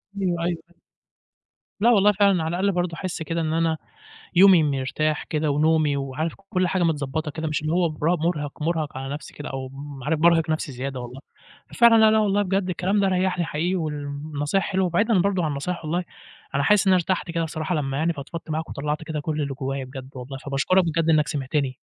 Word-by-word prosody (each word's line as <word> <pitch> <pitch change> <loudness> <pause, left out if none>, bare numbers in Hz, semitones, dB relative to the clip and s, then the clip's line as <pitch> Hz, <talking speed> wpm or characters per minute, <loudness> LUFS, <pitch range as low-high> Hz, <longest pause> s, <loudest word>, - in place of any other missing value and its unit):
أيوه، 180 -4 -1
أيوه، 170 -1 -1
أيوه. 175 - -27 1.0
لأ 230 - +5
والله 210 -3 +5
فعلًا، 200 -4 +3
على - - -2
الأقل 200 +1 +2
برضه 175 -2 -1
أحس 185 -2 -5
كده 165 +2 -2
إن 155 -1 -1
أنا 165 -1 +1 0.6
يومي 185 -2 +7
مرتاح 150 +2 -1
كده، 155 -1 -1
ونومي، 155 0 +2
وعارف 140 +4 -3 0.2
كل 185 -3 +1
حاجة 185 0 0
متضبطة 155 -1 -1
كده 160 +2 -4
مش 150 -1 -2
اللي 155 +1 -1
هو 175 0 +2
برا 155 +3 0
مٌرهِق 155 -3 -2
مٌرهَق 160 -3 -1
على 135 +1 -4
نفسي 150 - -9
كده 145 - -7
أو 135 0 -5
ام 135 0 -9
عارف 155 +2 0
بارهق 165 -1 +4
نفسي 155 -2 -2
زيادة 130 +1 -5
والله. 125 +2 -8 0.5
ففعلًا 235 -1 +6
لا، 220 0 +7
لا 220 - +4
والله 205 -1 +2
بجد، 195 -1 0
الكلام 185 +3 0
ده 195 - +3
ريحنى 185 -1 +1
حقيقي 165 +4 -1
والنصايح 150 +1 -2
حلوة. 190 -1 0
وبعيدًا 200 +5 +2
برضه 185 -1 +1
عن 155 - 0
النصايح 155 +5 -4
والله 175 +4 -1 0.5
أنا 140 - +2
حاسس 205 +6 +4
إن 190 - +5
أنا - - +6
ارتحت 180 0 -1
كده 165 0 -1
الصراحة 160 +2 -3
لمّا 135 -3 -1
يعني 165 +3 +1
فضفضت 160 +2 -8
معاك 160 +1 -2
وطلّعت 150 +2 -3
كده 155 -1 -4
كل 155 0 -2
اللي 140 -1 -3
جوايا 135 0 -3
بجد 130 0 -9
والله 130 +1 -7
فباشكرك 145 +8 +1
بجد 165 0 0
إنك 150 -3 +3
سمعتني. 135 -2 -2
160 Hz, 210 wpm, -24 LUFS, 145-180 Hz, 1.0 s, يومي